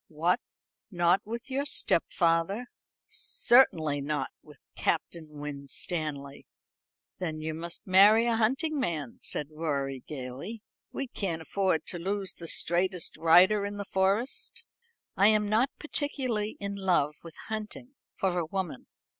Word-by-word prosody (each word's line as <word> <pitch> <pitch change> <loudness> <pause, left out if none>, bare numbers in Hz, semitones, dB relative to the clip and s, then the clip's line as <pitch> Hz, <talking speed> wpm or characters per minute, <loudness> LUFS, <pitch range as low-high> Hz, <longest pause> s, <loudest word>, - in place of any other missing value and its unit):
"What, 165 +4 +1 0.5
not 175 -1 +3
with 235 +4 -6
your 275 +2 0
stepfather?" 170 - +2 0.4
"Certainly 170 - +3
not 145 -1 -2
with 150 -1 -16 0.2
Captain 165 0 -1
Winstanley." 145 0 -4 0.7
"Then 160 -4 -3
you 155 0 -3
must 170 +2 -6
marry 205 +5 +7
a 235 -1 +2
hunting 270 +8 +1
man," 155 - -3
said 150 - -3
Rorie 140 -4 -3
gaily. 145 - -7 0.3
"We 275 - -3
can't 180 -9 -3
afford 185 -3 0
to 175 - -3
lose 195 +1 -1
the 170 - -9
straightest 175 +2 0
rider 180 +6 +5
in 205 0 -4
the 200 - -4
Forest." 215 - -1 0.5
"I 200 - +5
am 215 -1 +4
not 225 +6 +3
particularly 255 -8 -2
in 200 0 -4
love 180 -7 +1
with 165 -2 -11
hunting 220 +4 -6 0.2
for 180 -2 0
a 170 - -1
woman. 180 -7 -4
185 Hz, 130 wpm, -29 LUFS, 155-215 Hz, 0.7 s, marry